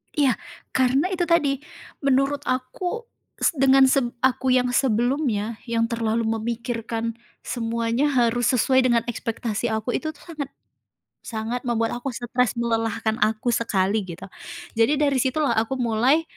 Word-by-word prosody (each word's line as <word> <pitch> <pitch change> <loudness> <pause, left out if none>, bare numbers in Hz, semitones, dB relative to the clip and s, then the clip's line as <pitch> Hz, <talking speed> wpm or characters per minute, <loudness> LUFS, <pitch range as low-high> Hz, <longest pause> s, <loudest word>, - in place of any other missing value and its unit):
Iya, 280 -5 +3 0.4
karena 260 +6 +3
itu 370 -2 -1
tadi. 295 -5 +2 0.4
Menurut 275 +1 +2
aku, 325 - -3 0.3
se - - +2
dengan 270 -1 +6
se 265 0 +3 0.2
aku 260 0 +2
yang 250 0 +3
sebelumnya, 240 -3 +1
yang 230 -1 0
terlalu 230 -1 -1
memikirkan 230 0 -3 0.2
semuanya 230 +4 -1
harus 240 -2 +2
sesuai 260 +1 +3
dengan 240 -2 +3
ekspektasi 230 -1 -2
aku, 220 +2 -1
itu 315 - -2
tuh 295 - -22
sangat 290 -5 -5 0.7
sangat 230 +3 -4
membuat 230 -1 0
aku 250 +1 -4
stres, 240 +1 0
melelahkan 225 -2 -1
aku 220 +2 +1
sekali, 210 -3 +1
gitu. 180 +1 -9 0.5
Jadi 230 +6 +4
dari 280 -2 +3
situlah, 270 +3 +1
aku 225 +4 +1
mulai 245 +4 +2
245 Hz, 135 wpm, -24 LUFS, 230-270 Hz, 0.7 s, dengan